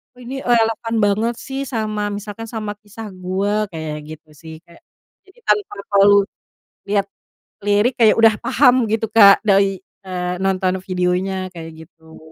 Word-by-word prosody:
“Oh 250 - -16
ini 260 +3 -6
relevan 230 -2 0
banget 215 +4 +1
sih 270 0 -5
sama, 215 -4 -2
misalkan 205 +2 -7
sama 220 -2 -5
kisah 215 +1 -10
gua,” 195 +3 -2
kayak 155 -1 -5 0.2
gitu 155 0 -29
sih. 160 +2 -12
Kayak 170 - -20 0.5
jadi 385 +5 -22
tanpa 415 0 +1 0.2
perlu 200 0 +6 0.6
lihat 200 -1 0 0.6
lirik, 205 +5 +2
kayak 225 -2 +4
udah 225 -1 +6
paham 250 -2 +3
gitu 225 0 0
Kak 205 -2 +7
dari, 195 -1 +3 0.3
eee, 180 -1 -3
nonton 190 -1 0
videonya 185 +1 -1
kayak 160 -1 -10
gitu. 160 -1 -18
205 Hz, 145 wpm, -19 LUFS, 185-225 Hz, 0.6 s, Kak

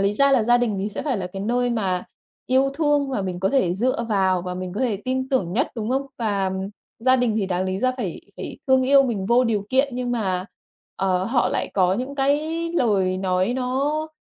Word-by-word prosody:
lý 200 +1 +2
ra 275 +5 +3
là 260 -4 +4
gia 240 +2 +4
đình 230 -4 0
thì 200 - -2
sẽ 210 - -5
phải 275 -5 -1
là 180 - -3
cái 195 +2 -7
nơi 245 +3 +1
mà 190 -6 -1 0.4
yêu 265 +2 +3
thương 290 -2 +1
và 235 -7 -1
mình 185 -1 -4
có 190 - +2
thể 190 -10 +2
dựa 235 +3 0
vào, 190 -3 +2
và 180 0 -4
mình 185 0 -5
có 230 - -3
thể 235 -6 +1
tin 260 +1 -1
tưởng 190 -10 0
nhất, 260 +8 +1
đúng 225 0 -3
không? 270 +1 0
Và, 200 -4 0
ừm, 190 +1 -4 0.3
gia 255 +3 +4
đình 245 -4 +1
thì 200 -3 0
đáng 185 0 -1
lý 190 0 -2
ra 255 +3 +1
phải 195 -9 -4 0.2
phải - - -7
thương 260 -1 +4
yêu 275 +1 +6
mình 215 -7 -2
vô 240 +4 +4
điều 210 -4 -1
kiện, 270 +2 +2
nhưng 250 -1 -2
mà, 190 -6 -1 0.5
ờ, 185 -1 +1
họ 240 +2 +1
lại - - -2
có 185 -1 +3
những 255 +6 -4
cái 280 +1 +2 0.3
lời 200 - +1
nói 185 +3 0
nó, 275 +5 -1
230 Hz, 235 wpm, -23 LUFS, 190-260 Hz, 0.5 s, yêu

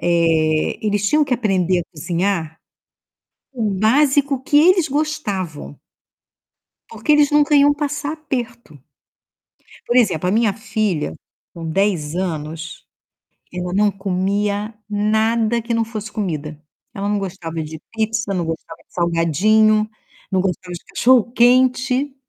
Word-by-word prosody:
eh, 165 -2 +1
eles 205 -1 +1
tinham 300 0 +3
que 260 - 0
aprender 190 -6 +1
a - - -6
cozinhar 170 0 -2 1.0
o 225 -4 -1
básico 270 +6 +2
que 290 - +3
eles 350 +1 +5
gostavam. 205 - -3 1.1
Porque 300 - 0
eles 295 -1 +4
nunca 295 0 +4
iam 290 +1 +5
passar 290 +1 -3
aperto. 240 - -6 1.1
Por 240 - +1
exemplo, 180 -8 +2
a - - +1
minha 220 -2 +2
filha, 200 - -2 0.4
com 165 -1 -8
10 175 -4 0
anos, 165 -2 -5 0.7
ela 180 0 -4
não 205 +1 +3
comia 200 +3 -2
nada 220 +2 +1
que 235 +1 -3
não 230 0 +1
fosse 215 -1 -7
comida. 155 -7 -4 0.3
Ela 200 0 -3
não 205 - +1
gostava 175 -4 -5
de 155 0 -8
pizza, 220 -1 -1
não 175 -3 -1
gostava 165 0 -6
de - - -33
salgadinho, 210 +6 +2 0.4
não 190 - +2
gostava 180 -1 -2
de 170 - -9
cachorro-quente. 255 +2 +3
205 Hz, 125 wpm, -19 LUFS, 175-240 Hz, 1.1 s, eles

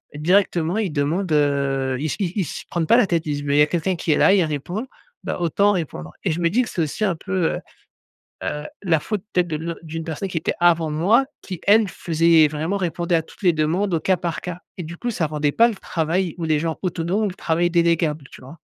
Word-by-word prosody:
directement, 175 +2 +2
ils 210 -6 -1
demandent, 160 +5 -1
heu 140 -3 +1
ils 150 - -3
s - - -3
ils 185 -4 -1
ils 200 - +1
se - - -7
prennent 170 -2 -1
pas 235 - +6
la 245 - +4
tête, 170 -2 0
ils 150 - -2
disent: 145 0 -4
«Mais 140 0 +1
il - - +5
y - - +7
a 150 - +5
quelqu'un 175 +3 -1
qui 165 - -1
est - - +1
là, - - +5
et 200 - +4
il - - +4
répond, 160 - -4 0.4
ben, - - -3
autant 190 +4 +2
répondre» 140 - -4
et 185 - +2
je 160 - -2
me 170 - +3
dis 230 +9 +2
que 235 - -6
c'est 175 - -2
aussi 155 +7 -3
un 190 -4 +1
peu, 185 0 -1
heu - - -4 0.8
heu, 150 - -3 0.2
la 170 -5 +2
faute, 205 +4 -3
peut-être, 180 -1 +2
de 155 - -2
l 165 +2 -4
d'une 165 0 -5
personne 165 +4 -4
qui 180 - -4
était - - -1
avant 170 -2 +4
moi, 200 - +3 0.2
qui, 185 -4 -7
elle, 215 +1 +6
faisait 165 -1 +3
vraiment, 155 +6 -2
répondait 175 -1 -1
à 165 - +1
toutes - - -18
les 180 - +5
demandes, 170 +5 0
au 165 - +2
cas 185 +4 +2
par 170 -3 -3
cas 180 -1 -6 0.2
et 180 - -4
du 165 +2 -7
coup, 240 +4 -2
ça 170 -7 -1
rendait 150 -1 0
pas 230 - +5
le 225 - -4
travail 170 -1 -1
ou 170 - -3
les 155 -2 +2
gens 160 0 -2
autonomes 180 +3 -1
ou - - +1
le - - -7
travail 170 -1 0
déléguable, 170 -3 +2
tu - - -12
vois? 135 +6 -12
170 Hz, 265 wpm, -22 LUFS, 155-185 Hz, 0.8 s, y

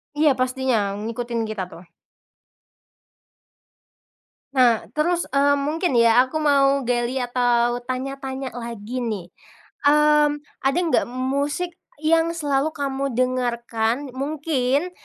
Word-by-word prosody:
Iya, 300 0 +4
pastinya, 255 -6 0
ngikutin 230 +2 -3
kita 215 -4 -4
tuh. 180 0 -13 2.7
Nah, 245 -4 +4
terus, 345 +3 +1
eee, 285 +1 +4
mungkin 300 +1 0
ya, 230 +1 +6
aku 310 - -3
mau 280 -2 +3
gali 240 +1 0
atau 245 -1 +1
tanya-tanya 265 0 -4
lagi 235 0 -5
nih. 215 -7 -3 0.6
Mmm, 295 0 +4 0.2
ada 275 +4 +2
enggak 335 -3 +2
musik 280 +7 -2 0.3
yang 330 +1 +3
selalu 290 -2 0
kamu 275 -2 -2
dengarkan, 240 0 -1
mungkin, 285 +2 -1
260 Hz, 105 wpm, -22 LUFS, 240-290 Hz, 2.7 s, ya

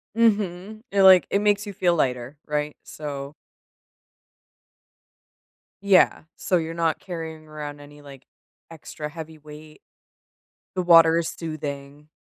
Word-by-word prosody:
Mhm, 215 -1 0
it, 200 - +2
like, 190 -1 +8
it 200 - +1
makes 205 0 +1
you 205 - -7
feel 175 -2 +1
lighter, 125 -1 -2
right? 150 0 -2
So 145 -1 -7 2.5
yeah, 195 -2 +4 0.2
so 185 - 0
you're 165 -1 -1
not 165 -2 0
carrying 160 -3 -7
around 150 -1 -8
any, 145 0 -14
like, 140 -2 -14 0.5
extra, 150 -1 -8
heavy 160 0 -9
weight. 150 +1 -14 0.9
The 185 - -1
water 165 -1 +6
is 165 - -2
soothing. 145 -2 -7
160 Hz, 125 wpm, -24 LUFS, 150-180 Hz, 2.5 s, like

